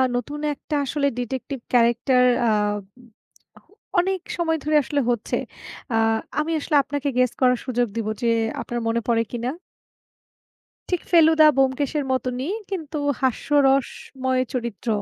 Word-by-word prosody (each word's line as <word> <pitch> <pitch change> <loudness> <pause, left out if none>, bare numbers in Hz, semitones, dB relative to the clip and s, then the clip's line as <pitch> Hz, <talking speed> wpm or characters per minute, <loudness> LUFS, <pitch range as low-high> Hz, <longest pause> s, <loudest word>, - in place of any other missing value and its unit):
নতুন 290 +5 -3
একটা 295 +1 -5
আসলে 280 +1 0
ডিটেকটিভ 260 +2 -4
ক্যারাক্টার 240 +2 +3 0.3
আ - - +4 1.5
অনেক 375 +1 0 0.2
সময় 325 -2 +1
ধরে 305 +1 +1
আসলে 285 +1 -1
হচ্ছে 235 -2 -1 0.6
আ - - +2 0.4
আমি 305 +2 -1
আসলে 300 +1 -1
আপনাকে 285 +1 -2
গেস 255 -1 +3
করার 250 -1 +4
সুযোগ 245 -2 0
দিব 225 -2 -2
যে 235 - +2 0.3
আপনার 240 - -4
মনে 230 +1 0
পড়ে 230 -1 +2
কিনা। 240 +1 -2 1.4
ঠিক 360 -2 0
ফেলুদা-ব্যোমকেশের 300 -4 +4
মতনই, 260 +5 -2 0.2
কিন্তু 315 -5 -4 0.2
হাস্যরসময় 265 -1 +1
চরিত্র। 235 -2 -4
265 Hz, 120 wpm, -23 LUFS, 245-300 Hz, 1.5 s, আ